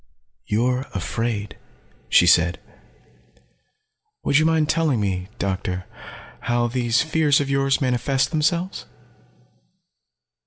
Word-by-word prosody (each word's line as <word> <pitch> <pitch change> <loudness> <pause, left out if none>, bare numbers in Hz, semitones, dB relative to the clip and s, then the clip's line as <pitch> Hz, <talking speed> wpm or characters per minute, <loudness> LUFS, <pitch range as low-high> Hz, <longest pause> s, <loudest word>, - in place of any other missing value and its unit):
"You're 125 +4 0
afraid," 105 +2 -3 0.5
she - - +5
said. 85 +2 +4 1.6
"Would 145 - +3
you 155 - +3
mind 160 -2 +2
telling 155 -6 +1
me, 95 -3 -2
Doctor, 95 -2 -3 0.5
how 120 0 0
these 120 +2 +1
fears 155 -3 +2
of 140 -1 -2
yours 135 0 +1
manifest 130 +2 0
themselves?" 170 +4 -1
125 Hz, 95 wpm, -22 LUFS, 105-150 Hz, 1.6 s, she